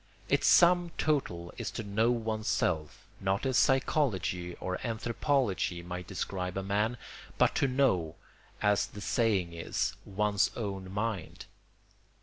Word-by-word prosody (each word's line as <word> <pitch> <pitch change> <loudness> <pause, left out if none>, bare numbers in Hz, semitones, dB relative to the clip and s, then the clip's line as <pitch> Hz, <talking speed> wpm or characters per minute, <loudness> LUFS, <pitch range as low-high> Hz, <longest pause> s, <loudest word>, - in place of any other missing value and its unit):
Its - - +3
sum 175 0 +6
total 90 - -1
is - - -2
to 115 - -5
know 110 +3 +1
oneself, 110 -9 -1
not 95 +5 0
as 130 -1 +1
psychology 105 - +1
or 90 0 -4
anthropology 115 - 0
might 90 0 -6
describe 95 -1 -3
a 95 - -2
man, 105 +5 0 0.4
but - - +4
to - - +2
know, 120 - +1 0.5
as 105 -1 +3
the 105 - -10
saying 100 -5 +1
is, 85 0 -2
one's 100 0 +1
own 95 -4 -4
mind. 105 -4 -3
105 Hz, 130 wpm, -30 LUFS, 90-120 Hz, 0.5 s, sum